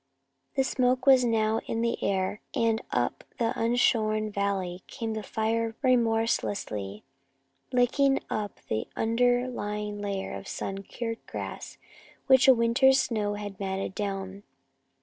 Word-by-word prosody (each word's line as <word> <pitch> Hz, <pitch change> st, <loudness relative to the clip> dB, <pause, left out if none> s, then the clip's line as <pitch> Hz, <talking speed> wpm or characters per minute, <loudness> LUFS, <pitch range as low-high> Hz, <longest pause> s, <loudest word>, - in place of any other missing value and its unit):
The 270 Hz, -, +3 dB
smoke 255 Hz, -1 st, +1 dB
was 265 Hz, -2 st, +7 dB
now 225 Hz, -2 st, +2 dB
in 225 Hz, -, -1 dB
the 235 Hz, 0 st, -1 dB
air, 195 Hz, +1 st, 0 dB
and 230 Hz, 0 st, +2 dB
up -, -, -1 dB
the 230 Hz, 0 st, +1 dB
unshorn 220 Hz, -2 st, +2 dB
valley 195 Hz, -3 st, -2 dB
came 225 Hz, -4 st, -4 dB
the 220 Hz, -, -3 dB
fire 225 Hz, +1 st, -1 dB
remorselessly, 225 Hz, -, 0 dB, 0.7 s
licking 270 Hz, +2 st, +3 dB
up 210 Hz, -2 st, -4 dB
the 110 Hz, -, -2 dB
under 245 Hz, +2 st, +2 dB
lying 210 Hz, -3 st, -4 dB
layer 195 Hz, -, -3 dB
of 95 Hz, 0 st, -7 dB
sun 195 Hz, 0 st, -4 dB
cured 230 Hz, +3 st, -5 dB
grass -, -, -6 dB, 0.5 s
which 265 Hz, -1 st, +6 dB
a 265 Hz, -, +9 dB
winter's 255 Hz, +3 st, +4 dB
snow 210 Hz, -5 st, 0 dB
had 205 Hz, -2 st, -7 dB
matted 190 Hz, -1 st, -3 dB
down. 195 Hz, -1 st, -4 dB
225 Hz, 130 wpm, -28 LUFS, 200-245 Hz, 0.7 s, a